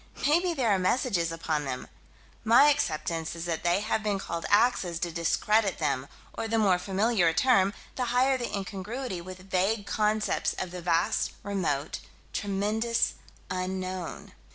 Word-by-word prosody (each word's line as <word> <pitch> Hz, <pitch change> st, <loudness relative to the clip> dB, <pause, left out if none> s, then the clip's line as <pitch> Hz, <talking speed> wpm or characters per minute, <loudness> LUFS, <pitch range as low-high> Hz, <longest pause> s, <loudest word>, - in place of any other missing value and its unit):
Maybe 340 Hz, +4 st, +3 dB
there 245 Hz, -6 st, +2 dB
are 195 Hz, -, +3 dB
messages 185 Hz, -4 st, +1 dB
upon 160 Hz, -2 st, -2 dB
them. 130 Hz, -2 st, -4 dB, 0.6 s
My 240 Hz, +6 st, +7 dB
acceptance 165 Hz, -, -1 dB
is 165 Hz, 0 st, -5 dB
that 165 Hz, -2 st, -2 dB
they 175 Hz, +3 st, +2 dB
have 215 Hz, 0 st, 0 dB
been 210 Hz, -2 st, 0 dB
called 170 Hz, -3 st, -4 dB
"axes" 205 Hz, -5 st, +3 dB
to 175 Hz, -, -1 dB
discredit 195 Hz, +5 st, +1 dB
them: 140 Hz, -4 st, -1 dB, 0.3 s
or 225 Hz, -, -3 dB
the 225 Hz, 0 st, 0 dB
more 195 Hz, -5 st, +3 dB
familiar 195 Hz, +1 st, +2 dB
a 165 Hz, -, +2 dB
term, 200 Hz, -4 st, +4 dB, 0.3 s
the 250 Hz, -, 0 dB
higher 250 Hz, +3 st, +3 dB
the 245 Hz, -2 st, -3 dB
incongruity 200 Hz, +2 st, -4 dB
with 185 Hz, +1 st, -11 dB
vague 200 Hz, +3 st, +1 dB
concepts 215 Hz, 0 st, 0 dB
of 185 Hz, -, -5 dB
the 180 Hz, 0 st, -6 dB
vast, 170 Hz, -1 st, +1 dB
remote, 170 Hz, -8 st, -2 dB, 0.3 s
tremendous, 210 Hz, +4 st, 0 dB, 0.4 s
unknown. 185 Hz, -1 st, -4 dB
195 Hz, 155 wpm, -28 LUFS, 175-225 Hz, 0.6 s, My